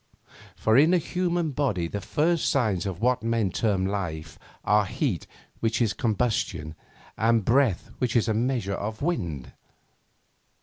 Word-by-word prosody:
For 110 Hz, +1 st, +2 dB
in 160 Hz, +5 st, +5 dB
a -, -, +5 dB
human 175 Hz, -1 st, -1 dB
body 125 Hz, -, 0 dB
the 100 Hz, +4 st, -5 dB
first 165 Hz, -, +1 dB
signs 105 Hz, -8 st, +1 dB
of 95 Hz, 0 st, -5 dB
what 125 Hz, 0 st, +2 dB
men 115 Hz, -4 st, 0 dB
term 100 Hz, -2 st, 0 dB
life 85 Hz, -6 st, -4 dB, 0.3 s
are 105 Hz, -1 st, +3 dB
heat -, -, -2 dB, 0.3 s
which 115 Hz, 0 st, 0 dB
is 115 Hz, -4 st, +2 dB
combustion, 110 Hz, -, -1 dB, 0.5 s
and 115 Hz, -2 st, +3 dB
breath 120 Hz, -6 st, +2 dB
which 125 Hz, -2 st, -1 dB
is 115 Hz, -1 st, +3 dB
a 110 Hz, -, +2 dB
measure 115 Hz, -3 st, 0 dB
of 110 Hz, +5 st, -4 dB
wind. 85 Hz, -, -2 dB
110 Hz, 145 wpm, -26 LUFS, 95-130 Hz, 0.5 s, in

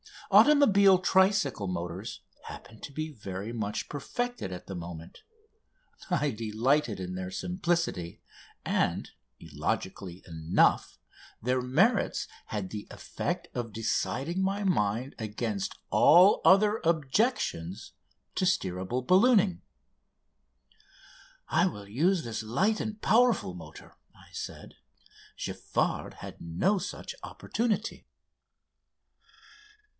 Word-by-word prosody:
Automobile 200 Hz, -11 st, +6 dB
tricycle 185 Hz, -, +2 dB
motors 90 Hz, +3 st, -5 dB, 0.2 s
happened 110 Hz, -, -11 dB
to -, -, -6 dB
be 155 Hz, +2 st, -4 dB
very 100 Hz, -4 st, -6 dB
much 110 Hz, -3 st, -3 dB
perfected 245 Hz, -, -4 dB
at 90 Hz, -, -7 dB
the -, -, -7 dB
moment. 85 Hz, -2 st, -8 dB, 0.9 s
I 150 Hz, -5 st, +1 dB
delighted 115 Hz, +2 st, 0 dB
in 90 Hz, 0 st, -5 dB
their 90 Hz, 0 st, -4 dB
simplicity, 170 Hz, -, -2 dB, 0.4 s
and, -, -, 0 dB, 0.3 s
illogically 95 Hz, -1 st, -4 dB
enough, 80 Hz, 0 st, +1 dB, 0.4 s
their 125 Hz, +2 st, +1 dB
merits 175 Hz, -, +2 dB, 0.2 s
had 100 Hz, -4 st, -4 dB
the 105 Hz, 0 st, -7 dB
effect -, -, -4 dB
of 115 Hz, -3 st, -4 dB
deciding 135 Hz, -, -1 dB
my 195 Hz, +2 st, 0 dB
mind 125 Hz, -, 0 dB
against 110 Hz, -2 st, -3 dB, 0.2 s
all 180 Hz, +5 st, +6 dB
other 210 Hz, +3 st, +5 dB
objections 150 Hz, -, 0 dB, 0.4 s
to 185 Hz, -, +1 dB
steerable 120 Hz, -, -1 dB
ballooning. 195 Hz, -, +4 dB, 1.9 s
"I 180 Hz, -, +3 dB
will 105 Hz, -, -6 dB
use 165 Hz, -, +2 dB
this 115 Hz, -2 st, -4 dB
light 185 Hz, -, +1 dB
and 220 Hz, 0 st, -4 dB
powerful 235 Hz, -, +3 dB
motor," 80 Hz, -3 st, -12 dB, 0.2 s
I -, -, -18 dB
said. -, -, -8 dB, 0.6 s
"Giffard -, -, -2 dB
had -, -, -10 dB
no 90 Hz, -, +1 dB
such -, -, -6 dB
opportunity." 225 Hz, -2 st, -3 dB
130 Hz, 100 wpm, -29 LUFS, -, 1.9 s, Automobile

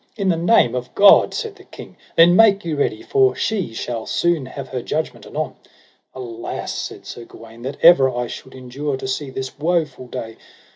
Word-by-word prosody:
In 195 Hz, -3 st, 0 dB
the 175 Hz, -, +3 dB
name 165 Hz, -, +3 dB
of 125 Hz, -1 st, -5 dB
God, 200 Hz, 0 st, +7 dB
said 445 Hz, -4 st, -5 dB
the 385 Hz, -, -15 dB
king, -, -, -12 dB, 0.2 s
then 170 Hz, +1 st, +6 dB
make 205 Hz, -2 st, +5 dB
you 160 Hz, -2 st, -2 dB
ready, 245 Hz, -, -1 dB
for 400 Hz, +2 st, +2 dB
she 200 Hz, -, -2 dB
shall 115 Hz, -1 st, -4 dB
soon 170 Hz, -6 st, 0 dB
have 135 Hz, 0 st, -8 dB
her 125 Hz, -, -4 dB
judgment 155 Hz, +6 st, -4 dB
anon. -, -, -4 dB, 0.6 s
Alas, 120 Hz, -3 st, -6 dB
said -, -, -6 dB
Sir 120 Hz, -, -8 dB
Gawaine, 115 Hz, 0 st, -14 dB
that 135 Hz, +3 st, -6 dB
ever 165 Hz, -6 st, +7 dB
I 125 Hz, -1 st, -3 dB
should 130 Hz, +2 st, -10 dB
endure 130 Hz, +2 st, -4 dB
to 130 Hz, -, -6 dB
see 135 Hz, +2 st, -3 dB
this 130 Hz, +1 st, -7 dB
woful 155 Hz, -6 st, -1 dB
day. 115 Hz, -2 st, -7 dB
140 Hz, 190 wpm, -20 LUFS, 125-175 Hz, 0.6 s, God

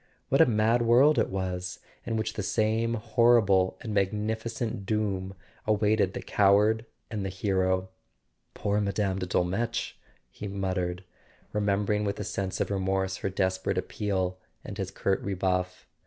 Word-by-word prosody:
What -, -, +4 dB
a -, -, +7 dB
mad 115 Hz, +1 st, +3 dB
world 125 Hz, +6 st, +5 dB
it -, -, +1 dB
was, 90 Hz, -1 st, -3 dB, 0.3 s
in 115 Hz, -, 0 dB
which 110 Hz, -, -2 dB
the -, -, -3 dB
same 110 Hz, +3 st, +1 dB
horrible 110 Hz, -4 st, +3 dB
and 110 Hz, -, -4 dB
magnificent 110 Hz, +3 st, -1 dB
doom 100 Hz, -3 st, -1 dB, 0.3 s
awaited 105 Hz, -2 st, +2 dB
the -, -, -5 dB
coward 105 Hz, +3 st, +3 dB, 0.2 s
and 105 Hz, -3 st, -3 dB
the 95 Hz, -, -2 dB
hero! 95 Hz, -1 st, 0 dB, 0.7 s
"Poor 105 Hz, 0 st, 0 dB
Mme. 100 Hz, -1 st, 0 dB
de 90 Hz, -, -3 dB
Dolmetsch!" 105 Hz, +8 st, -1 dB, 0.4 s
he 105 Hz, -, -7 dB
muttered, 95 Hz, -2 st, -2 dB, 0.5 s
remem¬ 105 Hz, -1 st, +1 dB
bering 105 Hz, +1 st, +1 dB
with 100 Hz, -1 st, -2 dB
a -, -, -2 dB
sense 95 Hz, -1 st, -3 dB
of -, -, -1 dB
remorse 95 Hz, 0 st, 0 dB
her -, -, -2 dB
desperate 95 Hz, 0 st, -1 dB
appeal 95 Hz, -2 st, -2 dB, 0.3 s
and -, -, -7 dB
his -, -, -2 dB
curt 95 Hz, -1 st, -1 dB
rebuff. 90 Hz, -1 st, -1 dB
100 Hz, 150 wpm, -28 LUFS, 95-110 Hz, 0.7 s, a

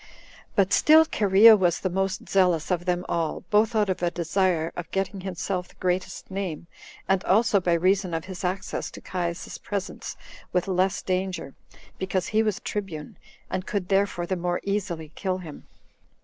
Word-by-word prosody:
But 195 Hz, -1 st, +3 dB
still 315 Hz, +1 st, +7 dB
Cherea 215 Hz, -3 st, +7 dB
was 175 Hz, -4 st, +2 dB
the -, -, -1 dB
most 195 Hz, +1 st, -1 dB
zealous 180 Hz, -4 st, +2 dB
of 175 Hz, -1 st, 0 dB
them 180 Hz, 0 st, 0 dB
all, 165 Hz, -2 st, -1 dB
both 215 Hz, +2 st, +3 dB
out 210 Hz, -1 st, +3 dB
of 185 Hz, -1 st, -2 dB
a 175 Hz, -, +2 dB
desire 170 Hz, -1 st, 0 dB
of 175 Hz, -1 st, -6 dB
getting 195 Hz, 0 st, -2 dB
himself 180 Hz, 0 st, -3 dB
the -, -, -21 dB
greatest 185 Hz, +1 st, -2 dB
name, 190 Hz, -5 st, -4 dB, 0.4 s
and 190 Hz, -1 st, +2 dB
also 215 Hz, +1 st, +4 dB
by 175 Hz, -1 st, +1 dB
reason 185 Hz, +1 st, +2 dB
of 160 Hz, -, -3 dB
his 185 Hz, -1 st, -7 dB
access 185 Hz, +1 st, -2 dB
to -, -, -10 dB
Caius's 175 Hz, -1 st, -4 dB
presence 200 Hz, -1 st, -5 dB, 0.3 s
with 180 Hz, 0 st, 0 dB
less 185 Hz, 0 st, +1 dB
danger, 185 Hz, -6 st, -2 dB, 0.5 s
because 185 Hz, -1 st, -1 dB
he 215 Hz, +1 st, +3 dB
was 215 Hz, -3 st, 0 dB
tribune, 180 Hz, -8 st, -5 dB, 0.3 s
and 185 Hz, -, -4 dB
could 195 Hz, -4 st, -2 dB
therefore 195 Hz, -3 st, +1 dB
the 185 Hz, -, -1 dB
more 175 Hz, 0 st, -1 dB
easily 185 Hz, -6 st, -3 dB
kill 185 Hz, -1 st, -2 dB
him. 165 Hz, -5 st, -10 dB
185 Hz, 170 wpm, -26 LUFS, 175-195 Hz, 0.5 s, still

